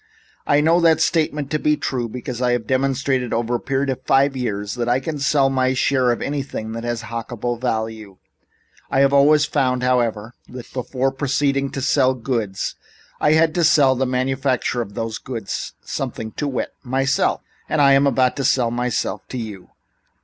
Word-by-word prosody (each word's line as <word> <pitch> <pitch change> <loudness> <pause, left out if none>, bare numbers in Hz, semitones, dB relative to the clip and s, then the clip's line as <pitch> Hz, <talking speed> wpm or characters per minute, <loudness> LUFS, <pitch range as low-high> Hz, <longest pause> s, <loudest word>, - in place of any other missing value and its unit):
"I 145 +1 +4
know 165 +3 +4
that 165 -2 +4
statement 150 -4 0
to 155 - 0
be 150 0 +2
true 120 -3 -2
because 125 +1 -6
I 125 -1 +2
have 120 -2 -1
demonstrated, 130 -1 0
over 120 +1 -1
a 120 - +1
period 135 0 -1
of 130 - -5
five 135 +1 +2
years, 105 -5 -3
that 120 -1 -2
I 125 +2 +3
can 150 +2 -4
sell 140 0 +3
my 130 0 +1
share 130 -1 +2
of 120 - -2
anything 135 -6 -4
that 115 +1 -5
has 120 -1 -3
a - - -8
hockable 120 +1 -4
value. 110 -5 -3 0.7
I 135 - +2
have 140 0 +4
always 145 +2 +5
found, 130 -4 0
however, 120 -3 0 0.2
that 125 -1 -10
before 130 +1 -1
proceeding 140 0 0
to 135 - -3
sell 130 -2 +3
goods 115 -5 -2 0.5
I 150 - +3
had 160 0 +3
to 175 - +1
sell 145 -4 +5
the 130 0 -1
manufacturer 130 -1 0
of 100 -3 -7
those 115 -1 -3
goods 115 -6 -5
something, 110 -1 -4
to 145 - -3
wit 130 -3 -3
myself! 135 +1 0 0.3
I 140 -2 +4
am 135 +1 +4
about 130 -2 +2
to 140 - -1
sell 125 -2 +2
myself 120 -4 -2
to 130 - -6
you." 105 -6 -7
130 Hz, 185 wpm, -21 LUFS, 120-140 Hz, 0.7 s, always